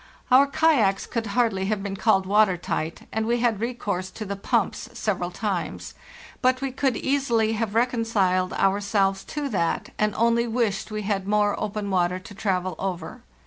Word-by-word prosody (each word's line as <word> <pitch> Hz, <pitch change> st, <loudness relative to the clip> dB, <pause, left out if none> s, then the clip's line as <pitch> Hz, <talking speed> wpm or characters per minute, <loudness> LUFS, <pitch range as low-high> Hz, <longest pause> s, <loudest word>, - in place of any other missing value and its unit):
Our 270 Hz, +3 st, +7 dB
kayaks 280 Hz, -11 st, +2 dB
could 230 Hz, -2 st, -3 dB
hardly 205 Hz, -3 st, +1 dB
have 205 Hz, 0 st, -1 dB
been 200 Hz, -1 st, -3 dB
called 195 Hz, -2 st, +2 dB
water 200 Hz, -1 st, +3 dB
tight, 165 Hz, -1 st, -3 dB
and 220 Hz, 0 st, -1 dB
we 240 Hz, +1 st, +1 dB
had 235 Hz, -4 st, +1 dB
recourse 210 Hz, -6 st, -3 dB
to 215 Hz, +3 st, -7 dB
the 200 Hz, 0 st, -3 dB
pumps 195 Hz, -, -1 dB
several -, -, -1 dB
times; -, -, -3 dB, 0.5 s
but 255 Hz, 0 st, +3 dB
we 270 Hz, 0 st, -2 dB
could 265 Hz, -1 st, 0 dB
easily 235 Hz, -6 st, +1 dB
have 220 Hz, -1 st, -2 dB
reconciled 225 Hz, -6 st, +1 dB
ourselves 195 Hz, 0 st, +1 dB
to 295 Hz, -1 st, -3 dB
that, 170 Hz, -7 st, -1 dB
and 210 Hz, -1 st, +1 dB
only 235 Hz, +1 st, +2 dB
wished 225 Hz, -4 st, -1 dB
we 215 Hz, -1 st, -4 dB
had 195 Hz, -1 st, -1 dB
more 205 Hz, 0 st, +2 dB
open 210 Hz, -1 st, -3 dB
water 180 Hz, -1 st, +1 dB
to 190 Hz, +2 st, -11 dB
travel 185 Hz, -3 st, -1 dB
over. 180 Hz, -4 st, -4 dB
210 Hz, 170 wpm, -25 LUFS, 195-235 Hz, 0.5 s, Our